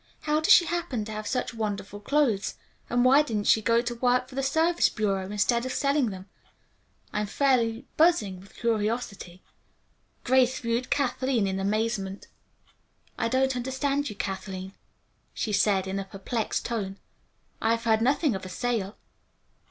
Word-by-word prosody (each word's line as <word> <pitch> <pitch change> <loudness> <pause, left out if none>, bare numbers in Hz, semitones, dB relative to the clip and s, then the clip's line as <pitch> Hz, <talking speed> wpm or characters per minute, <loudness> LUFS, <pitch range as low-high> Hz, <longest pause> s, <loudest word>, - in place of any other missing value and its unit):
How 300 0 +1
does 315 - +2
she 345 - +8
happen 315 -10 -2
to 220 - -7
have 215 0 -5
such 250 +1 -2
wonderful 205 -2 -4
clothes, 235 -3 +1 0.3
and 245 +1 +2
why 270 +3 +7
didn't 220 -8 -2
she 220 - +5
go 230 +2 +3
to 240 0 -3
work 250 +1 +1
for - - -13
the 270 - -1
Service 320 +5 +2
Bureau 195 -3 -1
instead 235 +3 +1
of 255 - -3
selling 280 -3 +1
them? 190 -1 -8 0.9
I'm 210 0 -1
fairly 240 0 +1
buzzing 305 - +3
with 195 +1 -17
curiosity." 215 -5 -2 0.8
Grace 260 0 +3
viewed 235 +1 -2
Kathleen 260 -4 +1
in 190 0 -2
amazement. 200 -1 -1 0.9
"I 225 - -1
don't 260 +2 +1
understand 270 +3 -1
you, 210 - -7
Kathleen," 190 -1 -5 0.6
she 215 - -2
said, 195 -1 +2
in 190 +1 -3
a 195 - -4
perplexed 200 +4 -3
tone. 200 -5 -3 0.6
"I 220 - +1
have 230 - -8
heard 220 -1 +2
nothing 275 +2 +2
of 190 - -5
a 185 - -7
sale." 220 -1 -2
230 Hz, 160 wpm, -27 LUFS, 200-260 Hz, 0.9 s, she